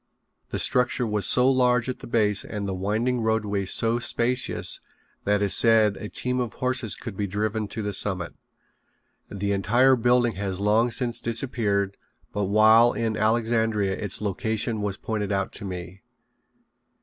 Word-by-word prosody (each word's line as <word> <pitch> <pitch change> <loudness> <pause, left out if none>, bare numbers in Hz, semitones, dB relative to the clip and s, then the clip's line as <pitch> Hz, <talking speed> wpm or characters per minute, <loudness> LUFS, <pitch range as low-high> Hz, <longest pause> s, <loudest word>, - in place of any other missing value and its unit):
The - - -3
structure 125 0 +1
was 105 -4 0
so 125 +6 +4
large 125 -2 +2
at 130 - -4
the - - -10
base 105 -3 +1
and 105 -2 -5
the 95 - -3
winding 110 +6 -1
roadway 105 -3 -1
so 115 +5 +3
spacious 125 +2 +1 0.5
that 105 0 +1
it - - +3
is 100 - +3
said 110 -3 +4
a 105 - -8
team 125 0 -3
of 120 -2 -3
horses 130 -4 0
could 115 -5 -8
be 100 +1 -3
driven 105 +2 -2
to 110 +1 -6
the 100 0 -3
summit. 90 -3 -1 1.0
The 100 0 -3
entire 120 +7 +3
building 120 0 +2
has 95 -2 -3
long 110 +4 +2
since 120 0 -2
disappeared, 110 -5 -1 0.4
but 105 0 -1
while 110 +4 +5
in 115 -2 -2
Alexandria 110 -2 0
its 100 0 -2
location 110 +2 -2
was 100 -2 -3
pointed 105 -2 -4
out 100 -1 -1
to - - -7
me. 90 0 -8
110 Hz, 160 wpm, -24 LUFS, 100-120 Hz, 1.0 s, while